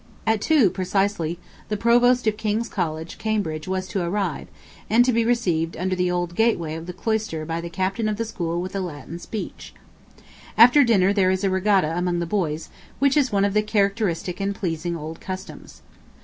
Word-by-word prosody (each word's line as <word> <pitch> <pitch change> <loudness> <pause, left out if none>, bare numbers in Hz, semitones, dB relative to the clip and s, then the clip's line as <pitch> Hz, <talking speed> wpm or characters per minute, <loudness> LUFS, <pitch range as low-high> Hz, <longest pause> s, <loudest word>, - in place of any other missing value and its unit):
At 220 -2 +1
two, 275 - +4
precisely, 185 -3 -1 0.3
the 210 - -1
Provost 245 +2 +4
of 215 -1 +2
King's 220 +2 -1
College, 160 -5 -4
Cambridge, 185 -8 -2
was 185 0 -2
to 195 - -1
arrive, 180 -2 -2 0.4
and 235 +3 +5
to 255 - +2
be 230 0 +2
received 180 -9 0
under 185 +2 -1
the 180 0 0
old 175 -1 -1
gateway 175 -7 +1
of 165 +1 -7
the - - -4
cloister 200 -4 -2
by 165 +1 -3
the 170 - -6
Captain 195 +5 -1
of 210 - -2
the 230 - -2
school 170 -6 -3
with 185 +2 -6
a - - 0
Latin 170 -2 -6
speech. 215 +3 -7 0.8
After 245 +5 +8
dinner 200 -5 +3
there 195 -2 +3
is 190 +1 0
a 195 - +2
regatta 190 -4 +2
among 175 0 0
the 170 - -1
boys, 165 -4 -2 0.3
which 275 -1 +3
is 280 -4 +2
one 200 -1 +2
of 200 - 0
the 210 - +3
characteristic 200 -4 0
and 200 0 -1
pleasing 170 -2 -3
old 160 +1 -8
customs. 190 0 -8
190 Hz, 190 wpm, -23 LUFS, 170-215 Hz, 0.8 s, After